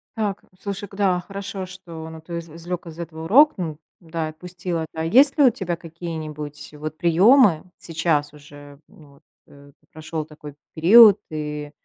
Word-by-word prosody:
Так, 205 -3 -2 0.2
слушай, 200 0 -5
к 195 - -13
да, 190 -3 +2
хорошо, 195 -1 -6
что, 170 -4 -10
но 160 0 -10
ты 170 +1 -6
изв 165 0 -11
извлек 175 +1 -6
из 160 -1 -10
этого 160 -1 -7
урок, 290 - +6
ну 160 -5 -4 0.2
да, 165 -1 -4
отпустил 175 +2 -6
это. 160 -1 -3
А 160 - -2
есть 265 - +4
ли 295 - +5
у 260 - +8
тебя 180 -5 -3
какие-нибудь 160 -3 -7
вот 155 +1 -7
приемы? 185 - +5
Сейчас 160 -3 -1
уже, 145 -1 -14
ну, 145 -3 -19
вот, 140 - -24 0.2
э, 140 0 -17
ты - - -35
прошел 155 0 -5
такой 150 -2 -12 0.2
период, 205 +5 +8
и 150 -1 -5
165 Hz, 175 wpm, -22 LUFS, 155-190 Hz, 0.2 s, у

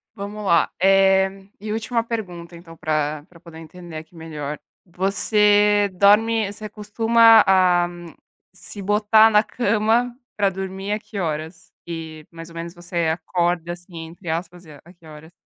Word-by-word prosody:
Vamos 205 +1 -7
lá. 170 -3 +2
Eh, 195 0 +4 0.3
e 210 +1 -6
última 225 +1 -1
pergunta 180 -7 -6
então 170 -1 -13
pra 155 -1 -2
pra 170 -2 -18
poder 165 -1 -13
entender 165 0 -11
aqui 160 +2 -12
melhor. 150 -3 -7 0.3
Você 205 +2 +3
dorme 210 +2 +3
você 215 +1 -8
costuma, 225 +2 +4
ah, 180 -2 +3 0.7
se 205 - -10
botar 210 +2 +4
na 210 0 +4
cama 230 +2 0 0.2
pra 200 -2 +2
dormir 190 +1 -6
a 215 - -2
que 205 -2 -8
horas? 160 0 -5
E 160 -2 -8
mais 165 0 -11
ou 165 - -15
menos 170 +1 -7
você 175 -1 -3
"acorda", 175 +1 -2
assim, 175 -2 -10
entre 170 +1 -10
aspas, 175 +2 -5
a 150 -2 -14
a 175 +2 -17
que 170 -2 -23
horas? 155 +1 -13
185 Hz, 155 wpm, -21 LUFS, 165-210 Hz, 0.7 s, Eh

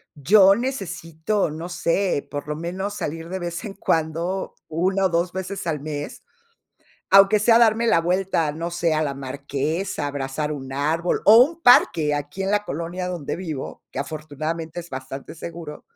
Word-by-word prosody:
yo 195 +7 +6
necesito, 200 - -2
no 165 +3 -6
sé, 175 -2 0
por 145 0 -5
lo 150 - -2
menos 185 +5 -4
salir 165 0 -5
de 190 +1 -3
vez 175 +1 -4
en 200 - -6
cuando, 170 +1 -1
1 190 +4 +1
o - - +3
2 170 +1 0
veces 190 0 -5
al 155 -3 -1
mes, 145 0 -6 0.9
aunque 195 +2 +7
sea 230 +2 +5
darme 230 0 +4
la 165 - +4
vuelta, 180 -3 0
no 165 +2 -4
sé, 170 -1 +1
a 155 - +1
la 140 -2 -2
marquesa, 140 +5 -3
abrazar 145 +1 -3
un 135 -3 -6
árbol, 160 +5 0
o 215 +2 +9
un 330 +5 -5
parque 165 - +5
aquí 145 +6 -5
en 190 - -1
la 210 0 +2
colonia 170 +4 -4
donde 175 -6 -4
vivo, 160 -7 -6
que - - -5
afortunadamente 155 +3 -4
es 170 0 -10
bastante 135 +2 -7
seguro. 165 -2 -8
165 Hz, 170 wpm, -23 LUFS, 150-190 Hz, 0.9 s, o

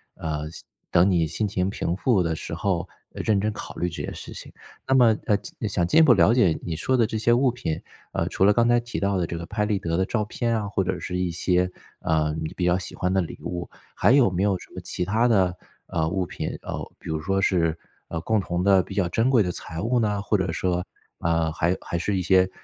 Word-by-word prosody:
呃， 75 -1 -4
心 - - -10 0.3
等 90 +3 +5
你 85 -3 +2
心 105 +7 -1
情 95 -1 -1
平 85 -3 -2
复 100 -3 +2
的 80 -1 -1
时 - - -5
候， 90 -3 -1 0.2
呃， - - -4
认 105 -3 +2
真 105 +1 -1
考 - - -8
虑 90 - -1
这 85 - -6
些 - - -4
事 - - -8
情。 - - -9 0.4
那 135 - +3
么， 115 -4 +6
呃， 105 - +4
进 110 - -5
想 90 -3 +1
进 160 - +4
一 - - +9
步 140 -6 +7
了 95 +5 +5
解 95 -10 +3
你 85 -2 -3
说 130 +10 +1
的 115 - +4
这 110 - -4
些 120 +2 +2
物 125 +1 +4
品， 80 -10 -3 0.3
呃， - - -1
除 95 - 0
了 105 - +7
刚 120 +1 +3
才 120 0 +4
提 120 0 -5
到 100 0 +1
的 85 -2 0
这 85 - -4
个 85 - -6
拍 105 +2 -1
立 105 -2 0
得 85 -2 -2
的 95 - +2
照 110 -3 0
片 115 +1 -1
啊， 105 - -4
或 100 -1 0
者 95 - -2
是 90 - -4
一 90 -1 0
些， 90 +2 +1 0.3
呃， 75 -1 +1
你 80 - -4
比 90 - -1
较 90 0 +4
喜 85 - -7
欢 90 0 -1
的 95 - +3
礼 85 - -6
物， 90 0 -4 0.2
还 105 - +3
有 125 -9 +5
没 90 +1 -1
有 100 -2 +2
什 - - -15
么 - - -7
其 90 - -3
他 115 +5 +2
的， 95 -6 +3 0.3
呃， 80 -1 -1
物 95 0 -1
品 - - -5
呃， - - -4 0.2
比 - - -13
如 80 -1 -2
说 95 +2 0
是 85 -4 +2 0.3
呃， 80 - -4
共 110 +4 +1
同 90 0 -2
的 95 -2 +5
比 95 +2 -8
较 95 -4 +2
珍 115 +8 +2
贵 120 -6 +5
的 90 - -1
财 80 -1 -6
物 120 +4 +1
呢？ 105 -2 0
或 105 -1 +1
者 95 -3 -1
说， 90 +1 -1 0.4
啊， 80 -1 +1
还 85 +3 0
还 85 - -3
是 100 +2 0
一 - - 0
些， 95 0 +4
95 Hz, 280 characters per minute, -25 LUFS, 85-105 Hz, 0.4 s, 一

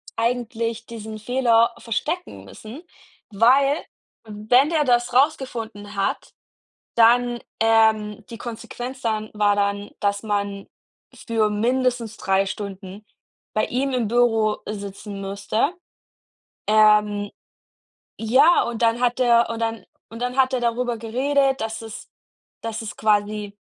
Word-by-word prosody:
eigentlich 230 -1 -2
diesen 220 -1 -8
Fehler 235 0 +2
verstecken 310 - -4
müssen, 245 +10 -11 0.5
weil, 270 +8 +3 0.4
wenn 220 +7 +2
der 315 -3 +2
das 240 -2 +1
rausgefunden 230 -7 -1
hat, 195 - -2 0.6
dann, 240 +1 +4 0.2
ähm 220 -1 +2
die 230 - -8
Konsequenz 245 +2 -7
dann 215 -3 -2
war 205 -1 +2
dann, 200 0 -1
dass 200 0 0
man 200 -2 -3 0.6
für 225 -2 +2
mindestens 240 +1 -1
3 195 0 +1
Stunden 200 0 -7 0.5
bei 215 - +2
ihm 265 +2 -1
im 240 -3 0
Büro 225 -2 +2
sitzen 200 -1 -7
musste. 205 - -1 0.9
Ähm, 210 -1 +4 0.9
ja, 265 +10 +4
und 235 0 -4
dann 230 +1 +2
hat 245 0 +1
er 235 -2 +4
und 230 0 -4
dann 225 -3 -3 0.2
und 230 +1 -9
dann 250 +1 -2
hat 265 0 +3
er 255 - 0
darüber 240 0 -1
geredet, 265 +3 +1
dass 220 0 -4
es 225 -1 -9 0.5
dass 225 0 -5
es 215 - -6
quasi 210 -1 0
225 Hz, 125 wpm, -22 LUFS, 210-245 Hz, 0.9 s, dann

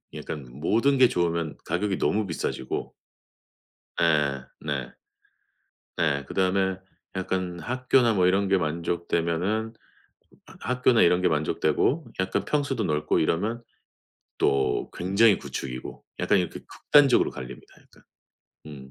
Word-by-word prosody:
약간 70 -3 -6
모든 110 - +1
게 130 -2 +6
좋으면 85 -4 -1
가격이 95 +3 -1
너무 105 0 +1
비싸지고 385 - -4 1.1
예. - - +2
네. - - -4 1.0
네. 70 -5 0
그다음에 95 +2 0 0.4
약간 95 -1 -3
학교나 125 +1 +2
뭐 90 -3 +3
이런 95 +2 +2
게 95 - +4
만족되면은 85 +5 -1 0.9
학교나 125 -1 +2
이런 90 +1 +4
게 90 - +3
만족되고 80 - +1
약간 95 0 0
평수도 140 -5 -1
넓고 75 -4 0
이러면 105 +9 0 0.8
또 65 -3 +1
굉장히 100 +4 +3
구축이고 65 -1 -7 0.2
약간 - - +3
이렇게 90 -3 -3
극단적으로 140 -4 +4
갈립니다, - - -10
약간. - - -23 0.6
음. 70 -3 -10
95 Hz, 265 characters per minute, -26 LUFS, 80-115 Hz, 1.1 s, 게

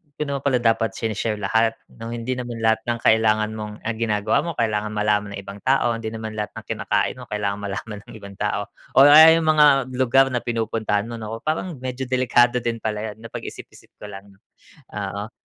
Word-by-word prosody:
'di 150 - -2
naman 140 -1 -2
pala 135 -3 +2
dapat 115 0 +1
sine-share 110 0 -2
lahat 110 +3 +1 0.2
nung 115 0 -9
hindi 120 +2 -3
naman 120 -2 -5
lahat 110 0 +3
ng 120 - 0
kailangan 110 -1 +3
mong 105 -1 -8
ang 115 0 -3
ginagawa 110 +1 +1
mo 170 +1 -4
kailangan 105 -2 0
malaman 105 -1 0
ng - - -6
ibang 100 +1 -9
tao, 130 -1 +2
hindi 115 -1 -5
naman 110 -1 -6
lahat 105 - -4
ng - - -9
kinakain - - -1
mo 125 - -10
kailangan 105 -1 -2
malaman 100 +1 -5
ng - - -12
ibang 100 -1 -11
tao - - -1 0.3
or 135 +2 +9
aya 160 +2 +9
yung 165 - -1
mga 145 -4 +4
lugar 130 +1 +3
na 120 - 0
pinupuntahan 110 -3 -1
mo, 115 -1 -7
naku 110 +1 -7
parang 160 +2 -2
medyo 130 0 -4
delikado 125 -1 +2
din 115 -1 -2
pala 110 0 -3
yan - - -27
napag-isip-isip - - -10
ko 105 - -7
lang 100 0 -11
'no, 95 - -26 0.6
oo. 100 +1 -4
115 Hz, 200 wpm, -22 LUFS, 105-125 Hz, 0.6 s, or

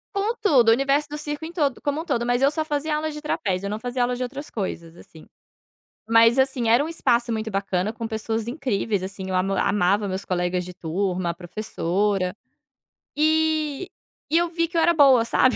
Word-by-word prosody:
Com 415 +4 0
tudo. 260 - +5
O - - +8
universo 275 +4 +2
do 300 - -5
circo 295 +1 -5
em 325 - -5
todo 290 -7 -1
como 290 +1 -1
um 330 - -5
todo, 235 -6 -1
mas 245 +1 +1
eu 275 - +5
só 310 +1 -1
fazia 300 0 -1
aula 310 0 -2
de 300 0 -8
trapézio, 195 -10 -2
eu - - -2
não 210 +1 -3
fazia 245 0 -2
aula 245 0 +1
de 250 - -3
outras 280 +4 -6
coisas, 170 -5 -5
assim. 160 -2 -15 0.8
Mas, 230 +2 +5
assim, 260 -4 +2
era 240 +5 +5
um 315 - -3
espaço 235 -7 +1
muito 220 0 -2
bacana 195 +1 -1
com 225 0 -5
pessoas 225 +1 -3
incríveis, 225 - -1
assim, 190 0 -6
eu 185 - -3
ama 195 +1 +1
amava 200 +1 +1
meus 190 +1 -4
colegas 180 0 -1
de 180 - -8
turma, 180 +1 -2
a - - -3
professora. 185 0 -2 0.8
Eh, 315 +1 +1 0.4
e 325 - +3
eu 345 0 +2
vi 335 0 0
que 340 - -14
eu 330 - +4
era 340 - +4
boa 270 -6 +6
,sabe? 255 +2 +3
235 Hz, 210 wpm, -23 LUFS, 195-295 Hz, 0.8 s, O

